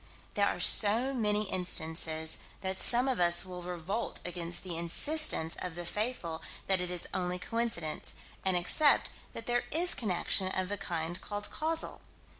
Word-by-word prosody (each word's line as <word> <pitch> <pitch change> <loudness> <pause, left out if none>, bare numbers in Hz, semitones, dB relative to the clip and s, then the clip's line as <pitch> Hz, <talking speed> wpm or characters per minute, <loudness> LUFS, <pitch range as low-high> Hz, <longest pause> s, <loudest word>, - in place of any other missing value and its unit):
There - - 0
are - - -4
so 230 +6 +3
many 210 -4 -1
instances 160 -3 0 0.2
that 190 0 -2
some 245 +2 +7
of 260 -6 -3
us 175 +1 +4
will 180 -1 -10
revolt 180 +5 -6
against 175 -1 -6
the 180 -3 -6
insistence 170 - +4
of 180 -3 -7
the 175 0 -7
faithful 185 -5 -5 0.2
that 190 -2 -1
it 180 - -5
is 180 -1 -6
only 180 0 -4
coincidence, 225 -6 -3 0.3
and 190 -1 +1
accept 285 - +3 0.2
that 230 - -9
there 240 0 -2
is 350 +3 +6
connection 190 -2 +1
of 185 0 -5
the 205 - -4
kind 170 -1 -6
called 205 0 -6
causal. 320 +1 -3
185 Hz, 160 wpm, -28 LUFS, 175-230 Hz, 0.3 s, some